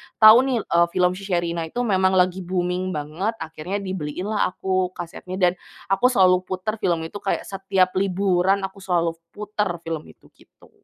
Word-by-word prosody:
tahu 215 +1 +9
nih, 255 -3 +1
eee, 170 0 +3
film 180 -1 +3
si 195 +2 -8
Sherina 170 -2 -1
itu 245 +9 -3
memang 190 -4 +2
lagi 185 0 +2
booming 180 0 -2
banget. 165 +10 -3
Akhirnya 175 +3 -5
dibeliin 185 +1 -4
lah 210 - +2
aku 185 -1 -1
kasetnya 180 +1 -7
dan, 180 -2 +3 0.4
aku 195 +6 +4
selalu 185 -7 +4
puter 200 +4 -3
film 170 -4 0
itu 165 +5 -6
kayak 195 - -2
setiap 190 -1 0
liburan, 195 0 +1
aku 195 +1 -6
selalu 175 -3 0 0.2
puter 210 -1 -2
film 165 -2 -5
itu, - - -19
gitu. - - -22
185 Hz, 170 wpm, -23 LUFS, 175-195 Hz, 0.4 s, tahu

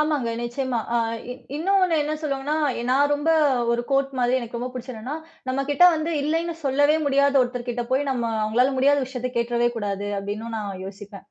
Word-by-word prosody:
ஆமாங்க 300 -6 +1
நிச்சியமா. 240 +1 -2 0.2
அ - - +4 0.3
இ - - -2 0.2
இன்னொன்னு 370 +1 +2
என்ன 300 +1 -2
சொல்லுவாங்கன்னா, 290 0 -2 0.2
எ - - -3
நான் 285 +3 +3
ரொம்ப 295 +3 +1 0.4
ஒரு 240 0 0
க்கோட் 275 0 +1
மாதிரி 245 +1 +2
எனக்கு 235 0 -6
ரொம்ப 245 +1 -3
பிடிச்ச 250 0 -7
என்னன்னா, 245 +7 -5 0.3
நம்ம 260 +1 0
கிட்ட 355 +5 +5
வந்து 315 +1 -2
இல்லைன்னு 330 +3 -1
சொல்லவே 290 +3 +3
முடியாத 280 0 +3
ஒருத்தர் 245 0 -4
கிட்ட 240 0 -1
போய் 260 +2 +2
நம்ம 245 -3 -1 0.2
அவங்களால 245 +5 +2
முடியாத 285 +2 +4
விஷயத்தக் 255 -1 -5
கேட்டுறவே 235 0 +1
கூடாது 205 -2 -3
அப்டின்னும் 210 +3 -5
நான் 200 -3 -5
யோசிப்பேன். 200 +1 -10
260 Hz, 185 wpm, -24 LUFS, 235-285 Hz, 0.4 s, கிட்ட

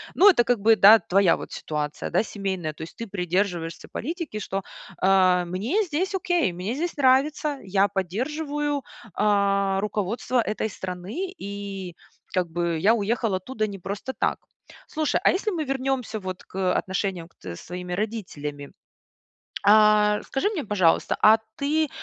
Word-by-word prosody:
Ну, 395 - +7
это 335 -11 +5
как 240 -1 +1
бы, 220 +2 +5
да, 210 +2 +9
твоя 195 -3 +3
вот - - -9
ситуация, 150 -1 -4
да, 180 - +2
семейная. 190 -7 -4
То - - -13
есть 160 - -10
ты 230 - -5
придерживаешься 180 -3 -2
политики, 320 - -4
что, 195 -1 -3 0.4
а, 185 -2 +4
мне 215 - 0
здесь 370 +3 -2
окей, 350 - +1
мне 180 +6 -3
здесь 335 +4 -3
нравится, 285 +2 +2
я 195 +1 +2
поддерживаю, 285 - -2 0.3
а, 200 -1 +2
руководство 210 +4 -1
этой 220 0 -2
страны, 190 - -5
и 200 - -6 0.4
как 180 -2 0
бы 170 -1 -1
я 210 +7 +4
уехал 220 -1 0
оттуда 215 +3 -2
не 200 -1 -7
просто 200 +8 -5
так. - - 0 0.5
Слушай, 310 -1 0
а - - +6
если 420 +3 -1
мы 335 -5 -2
вернёмся 265 -4 -2
вот 185 -2 -6
к, - - -18
э, 185 -1 +1
отношениям 185 -2 -2
к - - -23
с 85 -2 -7
твоими 180 0 -6
родителями. 175 -9 -4 0.9
А, 210 0 +5
скажи 270 +9 0
мне, 375 -9 -3
пожалуйста, 190 -6 +2
а 220 +1 +7 0.2
ты 305 +2 +1
205 Hz, 155 wpm, -25 LUFS, 185-265 Hz, 0.9 s, да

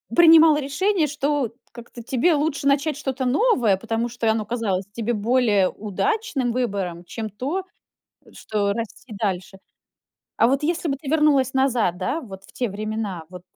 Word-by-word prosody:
принимала 325 -2 +7
решение, 320 +5 0
что 285 -4 -1 0.2
как-то 235 0 -11
тебе 260 +8 +2
лучше 290 -1 0
начать 280 +1 +1
что-то 265 -3 -3
новое, 250 - +3
потому 230 +3 -2
что 235 -1 -1
оно 220 -1 -1
казалось 205 -5 -2
тебе 230 +2 -2
более 215 -3 +2
удачным 270 - -2
выбором, 200 -8 -2
чем 220 +4 -5
то, 275 - -3 0.7
что 205 -2 -2
расти 230 +1 -7
дальше. 195 -2 -3 0.8
А - - +4
вот 270 +4 +1
если 335 +2 -1
бы 275 - 0
ты 280 0 -10
вернулась 295 -4 +3
назад, 250 -9 +1
да, 255 - -2
вот 195 -8 -11
в - - -18
те 245 - -2
времена, 210 -4 -4
вот 180 0 -11
245 Hz, 155 wpm, -23 LUFS, 210-290 Hz, 0.8 s, принимала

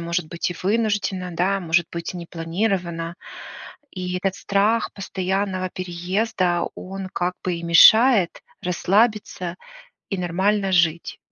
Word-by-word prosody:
может 170 0 -2
быть, 170 +2 -3
и - - -4
вынужденно, 205 -3 0
да, 190 +4 0
может 170 -1 +1
быть, 170 0 -4
непланированно. 170 0 -3 0.8
И 180 -1 -4
этот 190 +1 -1
страх 210 +3 +1
постоянного 190 -1 -2
переезда, 180 0 -1
он 190 0 -7
как 180 +1 -1
бы 180 - 0
и 170 - -6
мешает 210 +4 +6 0.2
расслабиться 190 -1 0 0.5
и 195 - -2
нормально 190 +3 0
жить. 170 -2 +1
185 Hz, 115 wpm, -22 LUFS, 170-195 Hz, 0.8 s, мешает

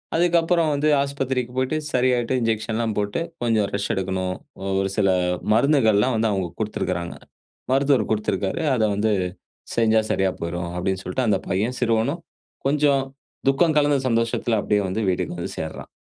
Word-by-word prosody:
அதுக்கப்புறம் 170 -1 +3
வந்து 145 +2 +1
ஆஸ்பத்திரிக்கு 135 -3 -2
போய்ட்டு 130 +4 0 0.2
சரியாயிட்டு, 125 -1 +2
இன்ஜெக்ஷன் 110 -1 -1
எல்லாம் 115 -2 -1
போட்டு 105 +6 -1 0.2
கொஞ்சம் 110 -4 +2
ரெஸ்ட் 100 +3 -1
எடுக்கணும். 95 -1 -2 0.3
அ - - -6 0.2
ஒரு 95 0 0
சில 100 -2 +3 0.4
மருந்துகள்லாம் 120 -3 +3
வந்து 110 0 +1
அவுங்க 95 -3 -1
குடுத்திருக்கிறாங்க. 90 -5 -2 0.6
மருத்துவர் 135 -4 +2
குடுத்திருக்காரு. 105 - -1
அதை 110 -2 +2
வந்து 110 +2 +1 0.6
செஞ்சா 110 -1 +4
சரியா 95 -1 +1
போய்ரும் 85 0 -3
அப்படின் 95 +1 -1
சொல்ட்டு, 130 -2 -1
அந்த 100 -3 +2
பையன் 110 +7 0
சிறுவனும் 120 +7 +1 0.5
கொஞ்சம் 140 -1 +3 0.5
துக்கம் 155 +3 +3
கலந்த 145 -1 +2
சந்தோஷத்தில, 115 -1 +1
அப்டியே 105 -1 +1
வந்து 110 +4 -2
வீட்டுக்கு 90 -1 -2
வந்து - - -4
சேருறான். - - -6
115 Hz, 145 wpm, -23 LUFS, 100-135 Hz, 0.6 s, செஞ்சா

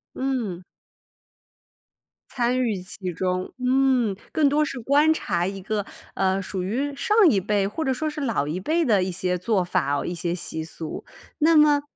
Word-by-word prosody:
嗯。 235 -10 -2 1.7
参 245 0 0
与 220 -4 0
其 185 0 -6
中， 185 +1 -2
嗯， 255 -4 +2 0.2
更 300 -2 +3
多 295 +2 +2
是 275 -3 -5
观 290 +6 +4
察 175 - -1
一 195 +1 -4
个， 205 +1 -2 0.3
呃， 190 0 +1
属 185 -1 -4
于 265 +10 -2
上 420 +9 0
一 200 - +2
辈 200 0 +1
或 315 +10 -4
者 265 - +1
说 310 +5 -2
是 300 0 -6
老 230 - 0
一 160 +4 -2
辈 320 - +1
的 210 -8 +3
一 185 - -1
些 180 0 -1
做 190 +1 +1
法， 145 -5 0
一 175 - -3
些 175 0 -2
习 160 -2 -4
俗。 160 0 -7 0.3
那 320 +1 +4
么 295 -1 +5
210 Hz, 185 characters per minute, -24 LUFS, 185-275 Hz, 1.7 s, 么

